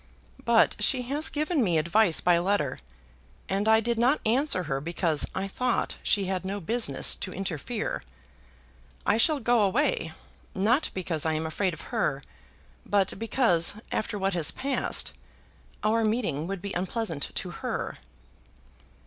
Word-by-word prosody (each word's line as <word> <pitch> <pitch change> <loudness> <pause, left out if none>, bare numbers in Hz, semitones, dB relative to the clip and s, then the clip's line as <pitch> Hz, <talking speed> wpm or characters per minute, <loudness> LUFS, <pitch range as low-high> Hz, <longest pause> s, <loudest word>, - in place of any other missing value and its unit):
But 235 -1 +4
she 255 -2 +2
has 285 +5 +1
given 305 -1 0
me 175 -6 +2
advice 170 +3 +3
by 175 -1 +4
letter, 175 -7 0 0.7
and 195 +2 -1
I 220 0 +6
did 230 +1 -1
not 255 +6 +3
answer 235 -4 +3
her 135 -4 -3
because 165 -1 +1
I 190 +1 -2
thought 250 +5 -1
she 200 -2 +2
had 185 -1 -2
no 195 +2 -3
business 225 +7 +1
to 185 - -5
interfere. 195 - -3 1.0
I 205 - +3
shall 295 +5 +3
go 240 -1 +2
away, 205 - +1 0.4
not 230 +10 +2
because 170 -5 -1
I 160 - +1
am 155 +1 -2
afraid 175 +3 -1
of - - -10
her, 135 -1 0 0.6
but 200 -2 0
because, 215 -7 +3 0.2
after 210 - -2
what 195 -1 0
has 170 -4 +2
passed, 275 0 0 0.7
our 225 +2 +2
meeting 215 - -1
would 195 -1 -5
be 200 - -4
unpleasant 180 -4 -2
to - - -4
her." - - -4
200 Hz, 150 wpm, -27 LUFS, 170-235 Hz, 1.0 s, I